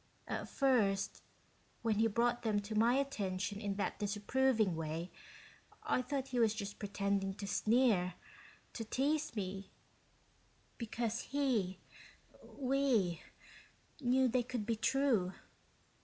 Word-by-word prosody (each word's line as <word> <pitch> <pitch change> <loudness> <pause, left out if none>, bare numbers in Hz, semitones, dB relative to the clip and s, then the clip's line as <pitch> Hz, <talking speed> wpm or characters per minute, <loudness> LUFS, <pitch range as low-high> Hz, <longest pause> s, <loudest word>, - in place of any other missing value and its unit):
At - - -3
first, 225 -8 +2 0.6
when 220 -2 +1
he 225 - +5
brought 240 +2 +1
them 215 -3 +1
to 205 +2 -6
my 230 +3 +4
attention 205 -7 -1
in 200 -2 -2
that 200 - -2
disapproving 210 0 +1
way, 165 +2 -4 0.7
I - - +1
thought 270 0 -3
he 250 - -1
was 220 -2 +4
just 205 -2 -5
pretending 200 -1 -1
to 205 - -6
sneer, 210 -4 +2 0.6
to 230 - -4
tease 285 +5 0
me, 195 -1 -4 1.1
because 230 0 -2
he 245 -10 0 0.6
we 255 - +1 0.8
knew 260 0 +3
they 250 +1 +2
could 245 -3 -4
be 230 +1 0
true. 225 -6 +2
220 Hz, 120 wpm, -35 LUFS, 200-255 Hz, 1.1 s, he